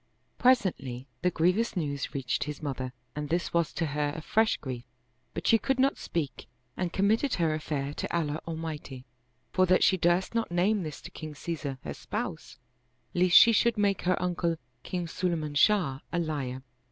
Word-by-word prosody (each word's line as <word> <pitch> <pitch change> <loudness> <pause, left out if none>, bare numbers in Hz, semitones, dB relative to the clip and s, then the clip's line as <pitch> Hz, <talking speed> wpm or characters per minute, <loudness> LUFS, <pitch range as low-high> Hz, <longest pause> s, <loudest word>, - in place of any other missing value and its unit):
Presently, 180 - +2 0.2
the 180 - +3
grievous 185 +6 +1
news 140 -5 -2
reached 130 -3 -1
his 150 +1 -6
mother 130 -3 -3 0.2
and 150 -1 -4
this 170 +2 -1
was 170 -2 +2
to 165 - -1
her 145 0 -1
a 160 - -5
fresh 220 +4 +2
grief; 125 -3 -6 0.5
but - - -4
she 225 - +5
could 270 +2 0
not 270 +1 +4
speak 150 -5 -4 0.3
and 180 -2 -2
committed 220 +9 +2
her 165 -3 +1
affair 145 -2 -2
to - - -4
Allah 155 -3 0
Almighty, 155 -5 -5 0.5
for 185 0 +3
that 185 +1 +4
she 190 - +5
durst 175 +3 +2
not 230 0 0
name 190 +4 +2
this 155 -4 -6
to - - -10
King 155 -2 -8
Caesar 145 -2 -4
her - - -4
spouse, - - -5 0.6
lest 180 0 +3
she 230 - +9
should 235 +1 +3
make 200 -2 +2
her 180 0 +1
uncle 175 -1 0 0.3
King 180 -1 -3
Sulayman 160 -3 -2
Shah 155 -5 +3
a - - -1
liar. 140 -6 -2
170 Hz, 175 wpm, -29 LUFS, 145-185 Hz, 0.6 s, she